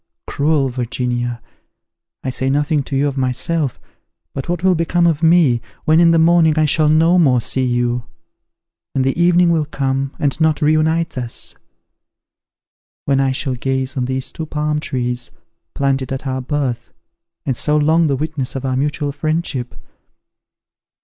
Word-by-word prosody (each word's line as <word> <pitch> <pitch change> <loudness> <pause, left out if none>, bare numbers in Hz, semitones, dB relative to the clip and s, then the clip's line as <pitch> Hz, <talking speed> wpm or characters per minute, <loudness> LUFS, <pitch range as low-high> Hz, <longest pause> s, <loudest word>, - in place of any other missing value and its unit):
Cruel 145 -2 +1
Virginia! 120 -1 -3 0.8
I 130 - -2
say 130 +1 -1
nothing 145 +2 +1
to 140 - -4
you 140 +2 +2
of 140 -1 -4
myself; 130 +2 -1 0.5
but 135 - -5
what 175 0 -2
will 190 -1 +4
become 170 +1 +1
of 165 -3 +1
me, 160 -8 +4 0.2
when 160 +1 +4
in 170 -1 +6
the 165 - +4
morning 160 -1 +4
I 155 - +4
shall 150 +1 +2
no 165 +3 +4
more 130 -7 +4
see 130 +3 -1
you; 120 -1 0 0.9
when 135 - +1
the 135 0 0
evening 175 0 +4
will 160 -2 +1
come, 135 -1 -2
and 145 +2 -1
not 160 -1 +2
reunite 155 0 +1
us? 120 -2 -5 1.5
when 135 -1 +2
I 135 -1 +2
shall 130 0 -2
gaze 130 +1 -2
on 130 -2 -1
these 130 0 -3
two 160 - -6
palm 150 0 -1
trees, 125 -4 -3 0.5
planted 135 -1 0
at 135 +1 -4
our 130 -1 -2
birth, 130 -3 -3 0.5
and 135 -4 0
so 150 +5 +1
long 160 +2 +3
the 140 - +1
witnesses 145 -2 -3
of 135 0 -4
our 130 -1 0
mutual 145 +1 -1
friendship? 145 -4 -3
140 Hz, 160 wpm, -18 LUFS, 130-160 Hz, 1.5 s, in